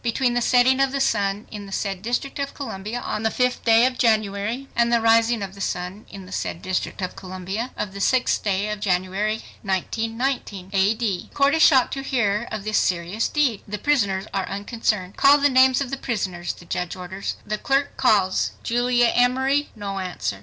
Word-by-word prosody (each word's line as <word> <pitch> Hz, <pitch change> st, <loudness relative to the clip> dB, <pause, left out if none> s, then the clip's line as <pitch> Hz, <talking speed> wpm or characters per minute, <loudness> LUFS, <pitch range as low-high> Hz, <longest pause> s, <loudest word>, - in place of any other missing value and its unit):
between 245 Hz, +1 st, +1 dB
the 245 Hz, -, +1 dB
setting 250 Hz, +2 st, +4 dB
of 270 Hz, -1 st, +3 dB
the 275 Hz, -, -2 dB
sun 205 Hz, -4 st, 0 dB
in 205 Hz, -2 st, -7 dB
the -, -, -11 dB
said 195 Hz, -1 st, -3 dB
District 245 Hz, +6 st, -3 dB
of 280 Hz, 0 st, -3 dB
Columbia 220 Hz, -3 st, -5 dB
on 210 Hz, -, -3 dB
the 220 Hz, -, +1 dB
sixth 250 Hz, +2 st, 0 dB
day 230 Hz, +1 st, +6 dB
of 255 Hz, -1 st, -1 dB
January 220 Hz, +3 st, 0 dB
and 235 Hz, 0 st, +2 dB
the 235 Hz, -, +4 dB
rising 230 Hz, -1 st, +3 dB
of 190 Hz, -1 st, -6 dB
the 200 Hz, -, -10 dB
sun 185 Hz, +3 st, -4 dB
in 195 Hz, -1 st, -10 dB
the 185 Hz, -, -13 dB
said 170 Hz, -, -3 dB
District 185 Hz, +1 st, -2 dB
of 185 Hz, -, -4 dB
Columbia 190 Hz, +5 st, -5 dB
o -, -, 0 dB
f 205 Hz, -, -7 dB
the 200 Hz, +1 st, -7 dB
sixth 255 Hz, +4 st, +2 dB
day 200 Hz, 0 st, 0 dB
o -, -, -2 dB
f 210 Hz, -, -4 dB
January, 200 Hz, +2 st, -1 dB, 0.2 s
1919, 220 Hz, 0 st, -2 dB
A. 195 Hz, +3 st, +3 dB
D." 215 Hz, -6 st, -2 dB
The -, -, -24 dB
court 280 Hz, 0 st, +3 dB
is 320 Hz, -, +2 dB
shocked 265 Hz, -6 st, +5 dB
to 270 Hz, -, -3 dB
hear 235 Hz, -5 st, 0 dB
of 215 Hz, -, -4 dB
this 215 Hz, +1 st, +1 dB
serious 180 Hz, +5 st, 0 dB
deed. 275 Hz, -9 st, +1 dB
The 210 Hz, +1 st, -4 dB
prisoners 205 Hz, -9 st, +1 dB
are 190 Hz, -1 st, -2 dB
unconcerned. 200 Hz, -2 st, -2 dB
"Call 280 Hz, +1 st, +7 dB
the 285 Hz, 0 st, +3 dB
names 260 Hz, 0 st, +5 dB
of 270 Hz, -2 st, -3 dB
the 270 Hz, -, -2 dB
prisoners," 190 Hz, -9 st, -3 dB
the 175 Hz, -, -15 dB
judge 180 Hz, +1 st, -3 dB
orders. 190 Hz, +2 st, -5 dB
The 210 Hz, 0 st, -3 dB
clerk 275 Hz, +1 st, 0 dB
calls, 205 Hz, -7 st, +2 dB
"Julia 240 Hz, 0 st, +2 dB
Emory." 265 Hz, +4 st, +2 dB
No 200 Hz, -2 st, -4 dB
answer! 180 Hz, -, -4 dB
215 Hz, 210 wpm, -23 LUFS, 195-250 Hz, 0.2 s, Call